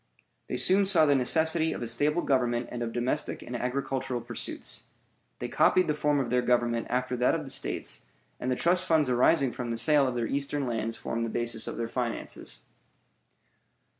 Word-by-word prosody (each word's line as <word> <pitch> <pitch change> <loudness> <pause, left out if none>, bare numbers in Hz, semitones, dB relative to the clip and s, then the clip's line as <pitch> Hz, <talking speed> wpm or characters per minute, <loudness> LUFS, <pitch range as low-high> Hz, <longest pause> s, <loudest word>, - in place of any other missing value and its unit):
They - - -3
soon 195 +1 +4
saw 175 -5 +5
the 145 - +4
necessity 160 +5 +3
of - - -5
a - - -2
stable 145 +9 +2
government 120 -3 0
and 120 - -5
of 115 -1 -2
domestic 125 +5 -2
and 125 - -7
agricultural 130 0 -2
pursuits. 120 0 -4 0.5
They - - -4
copied 185 -1 +3
the 150 - +1
form 150 -1 +1
of 125 -4 -2
their 125 0 +3
government 120 -1 +1
after 125 0 -1
that 125 +5 +2
of 160 - -3
the 135 - -5
States, - - -2 0.3
and 130 - -2
the - - +1
trust 180 +4 +1
funds 155 -4 +3
arising 130 +2 +3
from 120 +1 -5
the 115 - -2
sale 140 +4 +3
of 125 - -3
their 120 -1 -1
eastern 140 +2 -1
lands 115 -2 -2
formed 115 0 -3
the 115 - -2
basis 115 -1 -1
of - - -5
their 115 0 -2
finances. 120 0 -4
125 Hz, 195 wpm, -28 LUFS, 120-150 Hz, 0.5 s, saw